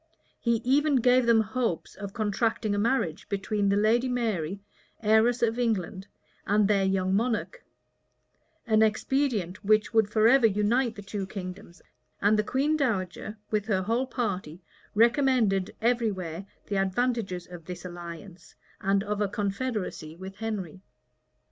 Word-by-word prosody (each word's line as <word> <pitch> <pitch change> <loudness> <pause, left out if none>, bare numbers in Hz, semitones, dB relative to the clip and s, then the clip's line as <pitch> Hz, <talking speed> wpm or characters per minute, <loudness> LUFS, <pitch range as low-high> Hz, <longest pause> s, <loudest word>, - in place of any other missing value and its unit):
[*] - - -40
He 235 -1 +1
even 285 +3 +3
gave 250 0 +4
them 230 -1 +5
hopes 220 -5 -2
of 200 0 -7
contracting 215 0 0
a 205 - 0
marriage 215 -8 0
between 200 0 0
the 200 - +3
lady 225 +5 +2
Mary, 200 -8 -1 0.4
heiress 225 +3 +3
of 230 +1 +1
England, 210 -4 -1 0.4
and 205 0 +3
their 200 -2 +2
young 190 -1 +1
monarch; 245 - -1 1.0
an 220 -2 +3
expedient 220 -3 0
which 215 +2 +2
would 220 -2 +3
forever 225 +3 +5
unite 220 +4 +1
the 205 - -9
two 195 -1 -4
kingdoms:[] 185 -2 -8 0.4
and 210 +2 +3
the - - +2
queen 280 +7 +1
dowager, 215 - -2
with 210 -1 0
her 190 -4 +1
whole 235 +6 0
party, 185 - -3 0.3
recommended 230 -5 +3
every 235 -1 +2
where 185 0 -6 0.2
the 200 - -2
advantages 195 -2 -1
of 175 -2 -11
this 180 +1 -8
alliance, 175 +1 -9 0.2
and 195 0 +1
of 210 0 -2
a 205 - +2
confederacy 200 -5 -3
with 190 +2 -9
Henry. 195 -6 -5
210 Hz, 145 wpm, -27 LUFS, 190-235 Hz, 1.0 s, them